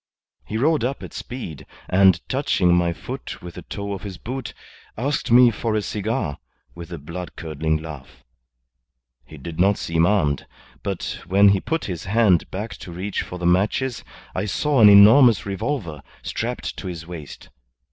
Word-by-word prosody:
He 110 Hz, -, -3 dB
rode 150 Hz, +4 st, +2 dB
up 135 Hz, +3 st, -2 dB
at -, -, -9 dB
speed, 120 Hz, -, -7 dB, 0.2 s
and 95 Hz, -2 st, +4 dB
touching 100 Hz, -10 st, +2 dB
my 85 Hz, -1 st, +2 dB
foot 85 Hz, -, -7 dB
with 90 Hz, -1 st, -8 dB
the -, -, -8 dB
toe 100 Hz, -1 st, -5 dB
of 95 Hz, -, -6 dB
his 95 Hz, -2 st, -7 dB
boot, 130 Hz, +1 st, -6 dB, 0.4 s
asked 140 Hz, +5 st, -1 dB
me 120 Hz, 0 st, +7 dB
for 110 Hz, 0 st, -2 dB
a 105 Hz, -, +1 dB
cigar, 100 Hz, -10 st, -2 dB, 0.3 s
with 85 Hz, +1 st, -10 dB
a 85 Hz, -, -5 dB
blood 85 Hz, +5 st, -7 dB
curdling 80 Hz, -1 st, -2 dB
laugh. 75 Hz, -4 st, -10 dB, 1.0 s
He -, -, -12 dB
did 85 Hz, -1 st, -8 dB
not 100 Hz, +3 st, +4 dB
seem 85 Hz, 0 st, +1 dB
armed, 75 Hz, -9 st, +1 dB, 0.3 s
but 95 Hz, -3 st, -4 dB
when 100 Hz, +3 st, +6 dB
he 100 Hz, -1 st, +2 dB
put 165 Hz, +1 st, -2 dB
his 90 Hz, -4 st, -5 dB
hand 100 Hz, -4 st, +3 dB
back 105 Hz, +4 st, -5 dB
to 90 Hz, -, -10 dB
reach 95 Hz, +4 st, -3 dB
for 90 Hz, -, -7 dB
the 90 Hz, -, -5 dB
matches 105 Hz, +8 st, +1 dB, 0.3 s
I 95 Hz, -, -2 dB
saw 140 Hz, +5 st, +1 dB
an 105 Hz, -, +9 dB
enormous 110 Hz, +2 st, +7 dB
revolver 100 Hz, -, -3 dB, 0.2 s
strapped -, -, -4 dB
to -, -, -6 dB
his 85 Hz, -2 st, -6 dB
waist. 85 Hz, -4 st, -10 dB
95 Hz, 170 wpm, -22 LUFS, 85-110 Hz, 1.0 s, an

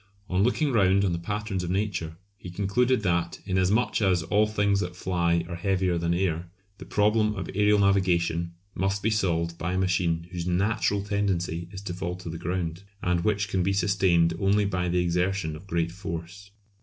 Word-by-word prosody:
On 90 Hz, +1 st, +2 dB
looking 135 Hz, +6 st, +2 dB
round 100 Hz, -3 st, +3 dB
on 95 Hz, -, +1 dB
the 85 Hz, -, -2 dB
patterns 105 Hz, +1 st, -3 dB
of 85 Hz, -, -4 dB
Nature, 90 Hz, -4 st, -2 dB, 0.2 s
he 95 Hz, -2 st, -10 dB
concluded 105 Hz, +6 st, +1 dB
that, 85 Hz, -2 st, 0 dB
inasmuch 95 Hz, +6 st, +1 dB
as 90 Hz, -4 st, +2 dB
all 105 Hz, +5 st, +2 dB
things 100 Hz, -2 st, +1 dB
that 90 Hz, -2 st, -3 dB
fly 85 Hz, -2 st, 0 dB
are 85 Hz, -, -6 dB
heavier 90 Hz, 0 st, 0 dB
than 85 Hz, 0 st, 0 dB
air, 85 Hz, -1 st, -1 dB, 0.3 s
the -, -, -9 dB
problem 105 Hz, +1 st, +2 dB
of 95 Hz, -, -4 dB
aërial 105 Hz, +1 st, +2 dB
navigation 85 Hz, -4 st, +2 dB, 0.2 s
must 95 Hz, +1 st, -1 dB
be 110 Hz, -, +2 dB
solved 85 Hz, -5 st, 0 dB
by 90 Hz, +2 st, -2 dB
a -, -, 0 dB
machine 85 Hz, -3 st, +1 dB
whose 90 Hz, -1 st, -4 dB
natural 100 Hz, +2 st, +1 dB
tendency 90 Hz, -5 st, -1 dB
is 95 Hz, -, -7 dB
to 90 Hz, -, -4 dB
fall 90 Hz, 0 st, -4 dB
to 90 Hz, -2 st, -7 dB
the 80 Hz, -, -6 dB
ground, 85 Hz, 0 st, -3 dB, 0.2 s
and 90 Hz, -1 st, +1 dB
which 105 Hz, 0 st, +1 dB
can 95 Hz, -, 0 dB
be 95 Hz, +2 st, +1 dB
sustained 95 Hz, -4 st, +3 dB
only 100 Hz, +1 st, +3 dB
by 90 Hz, -3 st, -1 dB
the 90 Hz, -, 0 dB
exertion 90 Hz, -1 st, 0 dB
of 85 Hz, +6 st, -12 dB
great 85 Hz, -2 st, -1 dB
force. 90 Hz, +2 st, -7 dB
95 Hz, 190 wpm, -26 LUFS, 85-100 Hz, 0.3 s, round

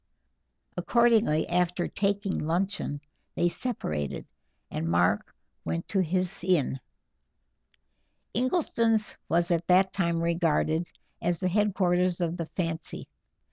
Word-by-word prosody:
Accordingly, 230 Hz, -9 st, +3 dB
after 180 Hz, 0 st, +1 dB
taking 200 Hz, -1 st, -1 dB
luncheon, 165 Hz, -3 st, -1 dB, 0.3 s
they 175 Hz, -, +2 dB
separated, 75 Hz, -, -3 dB, 0.5 s
and 80 Hz, +2 st, -2 dB
Mark 90 Hz, +4 st, +1 dB, 0.3 s
went 85 Hz, +1 st, -3 dB
to 195 Hz, -, +2 dB
his 185 Hz, +1 st, -1 dB
inn. 170 Hz, -7 st, +1 dB, 1.5 s
Ingleston's 230 Hz, -, +1 dB
was 170 Hz, +1 st, +2 dB
at 170 Hz, -1 st, 0 dB
that 185 Hz, +1 st, +4 dB
time 170 Hz, -3 st, 0 dB
regarded 165 Hz, -1 st, +1 dB, 0.3 s
as 175 Hz, 0 st, 0 dB
the 185 Hz, +1 st, -1 dB
headquarters 185 Hz, -3 st, +2 dB
of 170 Hz, 0 st, -1 dB
the 165 Hz, -2 st, -4 dB
fancy. 165 Hz, -3 st, -4 dB
175 Hz, 105 wpm, -28 LUFS, 165-195 Hz, 1.5 s, that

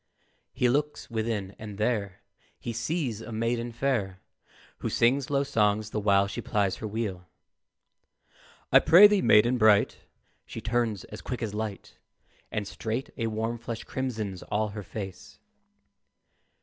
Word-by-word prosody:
He 125 Hz, -, +1 dB
looks 145 Hz, +1 st, -1 dB
within, 110 Hz, -4 st, -2 dB
and 105 Hz, -2 st, -8 dB
there 105 Hz, -4 st, -1 dB, 0.4 s
He 120 Hz, -, -5 dB
sees 125 Hz, -3 st, -2 dB
a 115 Hz, -, -8 dB
maiden 115 Hz, +2 st, -1 dB
fair, 115 Hz, -7 st, -1 dB, 0.6 s
Who -, -, -2 dB
sings 130 Hz, +3 st, +2 dB
low 140 Hz, -1 st, +2 dB
songs 105 Hz, -5 st, +1 dB
the -, -, -1 dB
while 100 Hz, -1 st, +4 dB
she 100 Hz, -, -5 dB
plies 100 Hz, -3 st, 0 dB
her 110 Hz, -, -5 dB
wheel. 100 Hz, -5 st, -4 dB, 1.4 s
"I -, -, +9 dB
prithee, 205 Hz, +3 st, +7 dB
maiden 120 Hz, 0 st, +5 dB
bright," 105 Hz, -2 st, +4 dB, 0.5 s
She -, -, -7 dB
turns 115 Hz, -4 st, -1 dB
as 105 Hz, -, -10 dB
quick 125 Hz, -2 st, -4 dB
as 105 Hz, -2 st, -3 dB
light, 105 Hz, -1 st, -5 dB, 0.5 s
And 105 Hz, -2 st, -2 dB
straight 115 Hz, +7 st, -4 dB
a 115 Hz, -3 st, -2 dB
warm 115 Hz, +2 st, -2 dB
flush 115 Hz, -1 st, -6 dB
crimsons 110 Hz, -8 st, -4 dB
all 105 Hz, +1 st, -1 dB
her 105 Hz, +1 st, -6 dB
face. 95 Hz, -1 st, -8 dB
110 Hz, 140 wpm, -28 LUFS, 105-120 Hz, 1.4 s, I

